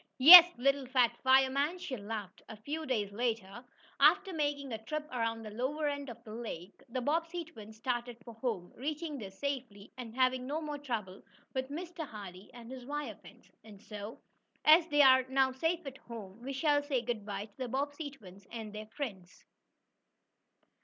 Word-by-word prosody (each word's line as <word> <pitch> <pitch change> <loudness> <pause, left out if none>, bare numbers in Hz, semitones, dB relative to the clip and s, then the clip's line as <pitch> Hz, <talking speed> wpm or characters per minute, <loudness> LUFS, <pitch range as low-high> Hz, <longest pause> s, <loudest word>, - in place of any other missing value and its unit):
"Yes, 340 +6 +12
little 275 +1 +1
fat 245 -2 +3
fireman," 270 +5 +3
she 355 -7 -5
laughed. 205 -3 -7
A 220 - -7
few 305 +8 -5
days 210 -6 -1
later, 225 0 -3 0.4
after 370 +7 +4
making 290 -4 -2
a 220 0 -6
trip 305 +5 -4
around 230 -2 -2
the 215 - -8
lower 275 +7 -2
end 285 -1 -3
of 235 0 -11
the 215 -2 -10
lake, 210 -5 -8
the 255 +2 -3
Bobbsey 330 +4 -1
twins 220 -7 -13
started 240 0 -3
for 235 - -9
home, 220 -6 -4
reaching 300 +2 -4
there 200 -4 -7
safely, 235 -2 -5
and 230 -2 -8
having 255 0 +1
no 300 +3 -2
more 300 -2 -5
trouble 215 -9 -5 0.3
with 260 0 -3
Mr. 335 +2 -6
Hardee 195 -4 -10
and 240 -1 -12
his 260 -1 -8
wire 285 -3 -4
fence. - - -17
And 210 -2 -14
so, 210 +1 -9 0.5
as 320 +2 +7
they 295 -2 +5
are 260 -1 +7
now 265 0 +3
safe 325 +5 -1
at 270 -1 -8
home, 220 -2 -10
we 265 +3 -5
shall 290 +1 +2
say 275 -4 -1
good 235 -3 -3
bye 200 0 -5
to 210 - -24
the 260 -1 -4
Bobbsey 285 +4 -3
twins 200 -7 -15
and 220 -3 -7
their 215 0 -7
friends. 210 -8 -7
255 Hz, 180 wpm, -32 LUFS, 220-290 Hz, 0.5 s, Yes